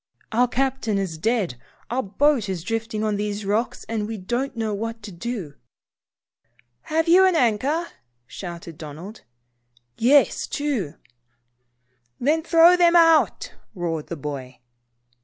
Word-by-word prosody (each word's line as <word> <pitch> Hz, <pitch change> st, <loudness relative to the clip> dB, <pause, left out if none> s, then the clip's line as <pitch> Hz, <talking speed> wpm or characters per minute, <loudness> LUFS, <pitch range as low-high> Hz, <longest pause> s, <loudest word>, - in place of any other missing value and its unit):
"Our 245 Hz, +2 st, +3 dB
captain 260 Hz, -4 st, -1 dB
is 180 Hz, -5 st, -3 dB
dead. 205 Hz, -, 0 dB, 0.3 s
Our 255 Hz, +2 st, +1 dB
boat 240 Hz, +1 st, +1 dB
is 180 Hz, -4 st, -3 dB
drifting 225 Hz, +1 st, -3 dB
on 210 Hz, -1 st, 0 dB
these 205 Hz, 0 st, -3 dB
rocks, 215 Hz, +5 st, -1 dB
and 220 Hz, -2 st, -2 dB
we 225 Hz, 0 st, -5 dB
don't 240 Hz, +7 st, -3 dB
know 220 Hz, -2 st, -1 dB
what 225 Hz, +2 st, -5 dB
to 205 Hz, -, -8 dB
do." 185 Hz, -4 st, -5 dB, 0.6 s
" 120 Hz, +1 st, -41 dB
Have 325 Hz, +1 st, +2 dB
you 360 Hz, +3 st, +7 dB
an 370 Hz, -, +2 dB
anchor?" 270 Hz, +6 st, +1 dB, 0.4 s
shouted 170 Hz, +1 st, -8 dB
Donald. 165 Hz, +8 st, -9 dB, 0.8 s
"Yes, 270 Hz, +5 st, +4 dB
two." 270 Hz, -, -2 dB, 1.2 s
"Then, 305 Hz, +6 st, +2 dB
throw 335 Hz, +2 st, +6 dB
them 345 Hz, -1 st, +4 dB
both 345 Hz, -, +7 dB
out," 325 Hz, -1 st, +2 dB, 0.2 s
roared 165 Hz, -4 st, -3 dB
the 170 Hz, -, -5 dB
boy. 135 Hz, -3 st, -7 dB
220 Hz, 140 wpm, -23 LUFS, 175-270 Hz, 1.2 s, you